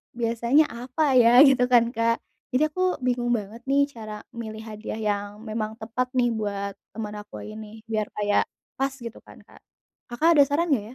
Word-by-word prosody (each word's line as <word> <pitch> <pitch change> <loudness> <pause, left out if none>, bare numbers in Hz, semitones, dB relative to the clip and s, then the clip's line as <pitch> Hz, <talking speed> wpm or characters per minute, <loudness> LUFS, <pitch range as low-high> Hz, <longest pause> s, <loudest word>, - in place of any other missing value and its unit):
biasanya 235 +5 +3
apa 255 +4 0
ya 240 0 +7
gitu 265 -3 +5
kan 240 -2 +4
Kak, 230 0 +1 0.4
jadi 300 - +4
aku 370 +3 0
bingung 245 -1 0
banget 215 +1 -6
nih 280 +1 +4
cara 215 -2 -8
milih 220 -2 -7
hadiah 215 0 -6
yang 205 -2 -1 0.2
memang 215 0 -3
tepat 235 +3 -2
nih 240 -1 +3
buat 200 -2 -3 0.2
temen 210 -1 -5
aku 210 - -9
ini 215 0 -10
biar 215 -1 0
kayak, 205 -1 +2 0.4
pas 270 0 0
gitu 235 -3 -8
kan - - -16
Kak, - - -19 0.5
Kakak 275 +8 +2
ada - - +10
saran 315 +4 0
nggak 225 -7 +2
230 Hz, 175 wpm, -25 LUFS, 215-255 Hz, 0.5 s, ada